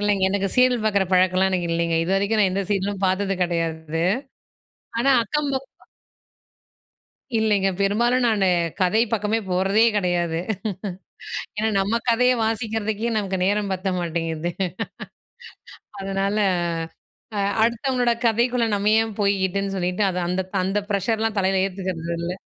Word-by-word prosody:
இல்லைங்க. 205 -2 +1
எனக்கு 195 0 0
சீரியல் 250 -2 +4
பாக்குற 200 -2 +2
பழக்கம்லாம் 185 +1 +3
எனக்கு 175 -2 -1
இல்லைங்க. 170 0 0
இதுவரைக்கும் 200 +4 +1
நான் 195 -2 +4
எந்த 195 +1 0
சீரியலும் 200 0 -1
பாத்தது 195 +1 0
கிடையாது. 165 -2 -2 1.0
ஆனா 270 +4 +3
அக்கம்ப 280 +3 -1 1.8
இல்லைங்க. 210 -3 +2
பெரும்பாலும் 240 +5 +2
நானு 210 -4 +2 0.4
கதை 210 +5 +3
பக்கமே 220 0 0
போறதே 190 +4 +3
கிடையாது. 175 -4 0 1.2
ஏன்னா 220 +1 +1
நம்ம 205 +4 +1
கதையே 250 +2 +4
வாசிக்கிறதுக்கே, 220 0 -1
நமக்கு 195 -3 -1
நேரம் 205 +1 +1
பத்த 185 +1 -3
மாட்டேங்குது. 165 0 -2 1.5
அதனால 195 +1 -1 1.0
அ, - - -1 0.2
அடுத்தவங்களோட 240 +1 +1
கதைக்குள்ள 235 +1 +2
நம்ம 205 +1 +1
ஏன் 225 0 -1
போய்க்கிட்டுன்னு 195 -1 0
சொல்லிட்டு, 180 +2 -1
அது 180 - -3
அந்த 180 +1 0 0.2
அந்த 195 +2 0
ப்ரஷர்லாம் 220 +2 0
தலையில 190 0 +2
ஏத்துக்கிறது 180 -3 -4
இல்லை. 175 +2 -3
200 Hz, 120 wpm, -23 LUFS, 185-220 Hz, 1.8 s, சீரியல்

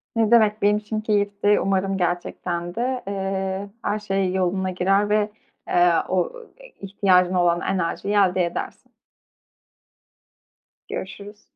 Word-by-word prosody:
Ne 225 -1 +2
demek, 215 -2 +4
benim 205 +1 +3
için 215 +1 -4
keyifti. 205 -1 +1
Umarım 195 0 0
gerçekten 175 -1 -3
de, 250 +1 -2
eee, 195 0 -3
her 210 - -1
şey 195 -3 -1
yoluna 190 0 0
girer 195 +3 +1
ve, 210 0 +1 0.4
eee, 175 0 +4 0.2
o, 185 -1 +2
ııı, 475 -2 -12 0.3
ihtiyacın 190 -2 +2
olan 175 -1 +2
enerjiyi 195 +2 -2
elde 185 -3 +3
edersin. 170 - -6 2.0
Görüşürüz. 200 +2 -7
195 Hz, 120 wpm, -23 LUFS, 185-210 Hz, 2.0 s, demek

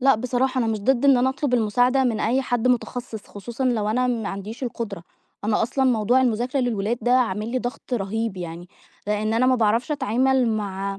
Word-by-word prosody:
لأ 270 +1 +5
بصراحة، 255 +3 -1
أنا 240 - +1
مش 220 -2 -1
ضد 255 +4 +1
إن 275 -2 +6
أنا 250 +1 +2
أطلب 265 -1 -1
المساعدة 245 +4 +2
من 230 -4 0
أي 255 +5 +1
حد 245 -1 0
متخصِّص، 245 -3 -2
خصوصًا 235 +5 -6
لو 225 -5 +1
أنا 250 +4 +1
ما 230 -4 -1
عنديش 205 +6 -7
القدرة، 225 -7 -4 0.4
أنا 210 +1 +1
أصلًا 265 +4 0
موضوع 245 0 +3
المذاكرة 250 +2 0
للولاد 230 -1 -1
ده 245 - +2
عامل 220 -4 +1
لي 255 - +1
ضغط 245 +1 -6
رهيب 220 -1 -2
يعني، 175 0 -7 0.4
لإن 210 +1 0
أنا 245 +3 +3
ما 255 - +4
باعرفش 230 +4 +1
أتعامل 260 -2 +1
مع 200 -2 -3
235 Hz, 195 wpm, -23 LUFS, 215-255 Hz, 0.4 s, إن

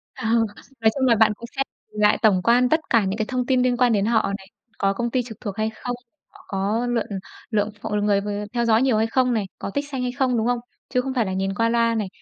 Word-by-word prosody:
Ờ, - - -6 0.5
nói 220 -1 +4
chung 260 - +2
là 230 - +5
bạn 220 0 +4
cũng 235 +3 -10
sẽ 270 - 0 0.3
lại 210 0 +3
tổng 200 -5 +4
quan 245 +2 +4
tất 315 - +4
cả 225 -4 +4
những 190 +2 -2
cái 215 - 0
thông 250 -1 -1
tin 255 -1 +2
liên 250 -1 +2
quan 245 -2 +4
đến 200 -1 +2
họ 220 -3 +2
này, 190 -1 -15 0.3
có 195 0 +1
công 235 +4 -2
ty 255 +1 +1
trực 225 -3 -10
thuộc 205 -2 -5
hay 215 0 0
không, 245 0 -4 0.3
họ - - -19
có 205 +5 -1
lượn 235 -2 0 0.5
lượng 210 -1 +1
ph - - -5 0.2
người, 205 -1 +3 0.2
ờ, 210 - -4
theo 235 -1 +1
dõi 225 0 +4
nhiều 260 -4 +3
hay 220 +1 +2
không 250 +1 +2
này, 220 -3 +1 0.2
có - - -4
tích 285 +7 -3
xanh 265 -3 -3
hay 250 0 -1
không, 250 -1 +1
đúng 225 +1 +1
không? 245 -1 +1 0.3
Chứ 250 - +1
không 265 +1 -3
phải 240 -4 +1
là 190 - -3
nhìn 195 +1 -1
qua 230 +2 +2
loa 230 0 +2
này, 215 -3 -1
230 Hz, 275 wpm, -23 LUFS, 210-245 Hz, 0.5 s, là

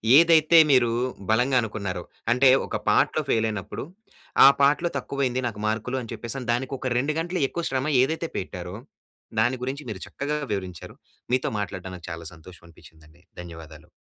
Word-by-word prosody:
ఏదైతే 165 +1 +6
మీరూ 125 -3 +4 0.4
బలంగా 125 +4 +3
అనుకున్నారో. 100 -5 -4 0.3
అంటే 130 +2 +5 0.2
ఒక - - -3
పార్ట్‌లో - - +3
ఫెయిలైనప్పుడు, 110 -4 -1 0.6
ఆ - - +11
పార్ట్‌లో 150 +5 +3
తక్కువైంది 130 -2 -2
నాకు 105 -2 -6
మార్కులు 115 +4 -2
అని 115 - -9
చెప్పేసని. 125 +1 -6
దానికొక 130 +1 -2
2 140 +5 0
గంటలు 175 +1 -2
ఎక్కువ 170 - -4
శ్రమ 135 +2 -1
ఏదైతే 160 +5 -1
పెట్టారో, 90 0 -6 0.7
దాని 120 +3 +1
గురించి 135 +2 -4
మీరు 95 -3 -8
చక్కగా 150 +2 -3 0.2
వివరించారు. 95 -3 -6 0.4
మీతో 130 - +1
మాట్లాడడం 95 -2 -5
నాకు 85 - -11
చాలా 85 0 -7
సంతోషమనిపించిందండి. 80 -1 -17 0.2
ధన్యవాదాలు. 80 -3 -12
120 Hz, 140 wpm, -25 LUFS, 90-135 Hz, 0.7 s, ఆ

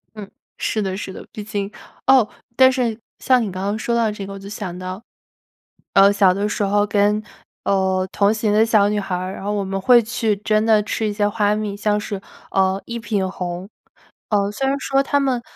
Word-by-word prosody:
嗯， 205 -2 -8 0.3
是 215 - -1
的 190 -1 -2
是 195 - -6
的， - - -10
毕 210 - -7
竟 205 -1 -4 0.4
哦， 260 -4 +6 0.3
但 260 +1 +6
是 240 -3 -1 0.2
像 255 -1 +3
你 210 -4 -2
刚 185 +1 -5
刚 205 +2 -1
说 235 +2 -1
到 230 -2 +2
这 205 -1 -6
个 195 - -8
我 195 - -8
就 195 - -10
想 190 -4 -6
到， 185 +4 -6 0.9
呃， 195 +1 +7
小 200 -2 +4
的 200 +2 -1
时 205 - -1
候 205 +1 +2
跟， 210 +1 +2 0.4
呃， 190 -1 +1
同 200 +1 +3
行 220 -1 0
的 220 +1 +5
小 210 -3 +4
女 210 0 0
孩 195 -2 -3
儿 185 +1 -4
然 - - -8
后 205 +1 -1
我 205 - -1
们 195 0 -3
会 240 +4 +6
去 225 -1 -1
真 215 +1 +1
的 215 -2 +4
吃 215 +1 -2
一 210 - -2
些 205 0 +1
花 205 0 +1
蜜 210 -1 -3
像 210 0 +1
是， 205 -2 -5 0.3
呃， 190 0 +1
一 235 - -5
品 205 -4 -1
红。 180 +1 -5 0.6
呃， 200 -1 +1
虽 270 +6 -2
然 275 +1 0
说 275 0 +1
它 285 +1 +1
们， 265 -3 0
205 Hz, 235 characters per minute, -21 LUFS, 195-220 Hz, 0.9 s, 呃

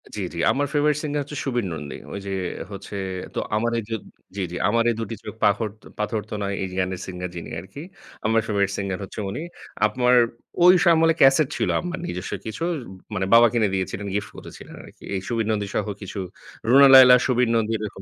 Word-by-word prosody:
জি, 105 - -4
জি। - - -8
আমার 145 +1 0
favourite 150 0 +2
singer 145 -1 -1
হচ্ছে 145 +1 -9
সুবীর 120 -5 -1
নন্দী। 75 -3 -6 0.2
ঐ - - -7
যে 100 - -4 0.4
হচ্ছে 100 +1 -8 0.4
তো - - -2 0.2
আমার 115 +2 0 0.2
জোদ 110 -2 -3 0.3
জি, 100 - -3
জি। 90 - -6
"...আমার 115 +2 +2
এই - - -3
দুটি 115 0 -4
চোখ - - -7
পাখর 105 +2 +2 0.3
পাথর 105 +1 -1
তো - - -7
নয় 100 0 -2
"এই 95 - -2
যে - - -8
গানের 95 0 -3
সিঙ্গার 90 -1 -5
যিনি 85 - -7
আরকি। 95 +11 -10 0.4
আম্মার 115 +1 +3
ফেভারিট 100 -2 +1
সিঙ্গার 95 -2 -3
হচ্ছে 95 - -8
উনি। 100 - -5 0.4
আম্মার 125 +3 +3 0.5
ওই 180 0 +7
আমলে 165 0 +4
ক্যাসেট 135 +2 +6
ছিল, - - 0
আম্মার 175 -1 -5
নিজস্ব 90 +2 -5
কিছু। 110 +9 -5 0.5
মানে 95 -2 -1
বাবা 120 +1 +8
কিনে 115 -3 +2
দিয়েছিলেন 95 +1 -3
গিফট 105 - -2
করেছিলেন - - -11
আরকি। - - -16
এই 95 - -2
সুবীর 115 -2 -1
নন্দী 105 -2 -1
সহ - - 0
কিছু 100 0 -6 0.5
রুনা 140 +3 +8
লায়লা, 130 -1 +10
সুবীর 125 -2 +2
নন্দী 115 -1 +1
এরকম। 105 -2 -6
110 Hz, 200 wpm, -23 LUFS, 100-130 Hz, 0.5 s, লায়লা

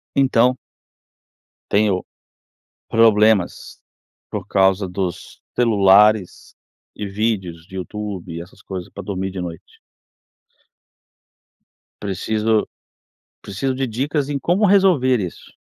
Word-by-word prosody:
Então 125 -2 +3 1.1
tenho 100 -3 +2 0.9
problemas 110 -4 +3 0.5
por 100 -3 -5
causa 95 -1 +2
dos 90 -1 -5
celulares 105 -3 +3 0.4
e 105 - -5
vídeos 95 -5 -2
de 95 - -10
Youtube, 95 -3 -6
essas 85 +3 -13
coisas, 95 -2 -7
pra 100 - -8
dormir 95 0 -3
de 95 0 -6
noite. 85 -2 -8 2.2
Preciso 110 +2 0 0.7
preciso 115 +7 -3
de 130 0 -2
dicas 135 +5 -1
em 145 - -1
como 180 +9 +1
resolver 180 - +4
isso. 90 -3 -7
105 Hz, 95 wpm, -20 LUFS, 95-120 Hz, 2.2 s, resolver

